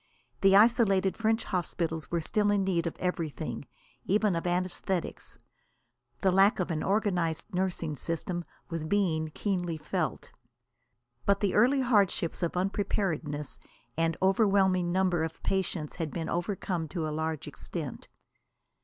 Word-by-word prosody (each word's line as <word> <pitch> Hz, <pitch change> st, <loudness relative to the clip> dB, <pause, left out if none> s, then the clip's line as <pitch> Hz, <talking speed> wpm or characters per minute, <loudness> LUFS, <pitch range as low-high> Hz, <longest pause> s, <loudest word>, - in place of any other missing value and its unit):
The 195 Hz, 0 st, +6 dB
isolated 200 Hz, -3 st, +4 dB
French 225 Hz, 0 st, +1 dB
hospitals 165 Hz, -3 st, -2 dB
were 170 Hz, -1 st, 0 dB
still 210 Hz, +5 st, +1 dB
in 205 Hz, -1 st, +2 dB
need 175 Hz, -3 st, 0 dB
of 165 Hz, -, -5 dB
everything, 160 Hz, -6 st, -3 dB, 0.4 s
even 205 Hz, -1 st, +2 dB
of 165 Hz, -, -2 dB
anæsthetics. 180 Hz, 0 st, -2 dB, 0.8 s
The 190 Hz, -, +4 dB
lack 195 Hz, +3 st, +5 dB
of 180 Hz, -1 st, -1 dB
an 155 Hz, -1 st, -1 dB
organised 190 Hz, -3 st, 0 dB
nursing 180 Hz, -4 st, -1 dB
system 170 Hz, +3 st, -3 dB, 0.2 s
was 165 Hz, -2 st, -4 dB
being 160 Hz, -3 st, +1 dB
keenly 175 Hz, -5 st, -1 dB
felt. 155 Hz, 0 st, -3 dB, 1.0 s
But 200 Hz, 0 st, +4 dB
the 200 Hz, -3 st, +1 dB
early 255 Hz, +6 st, +4 dB
handicaps 205 Hz, -9 st, +2 dB
of 170 Hz, 0 st, -1 dB
unpreparedness 180 Hz, -6 st, -1 dB, 0.4 s
and 165 Hz, 0 st, +1 dB
overwhelming 190 Hz, -3 st, +3 dB
numbers 175 Hz, -3 st, +1 dB
of -, -, -30 dB
patients 185 Hz, -5 st, -1 dB
had 165 Hz, -2 st, -2 dB
been 165 Hz, +1 st, -4 dB
overcome 175 Hz, -2 st, -2 dB
to 160 Hz, 0 st, -3 dB
a 155 Hz, -, -3 dB
large 160 Hz, -1 st, -3 dB
extent. -, -, -6 dB
180 Hz, 135 wpm, -29 LUFS, 165-195 Hz, 1.0 s, The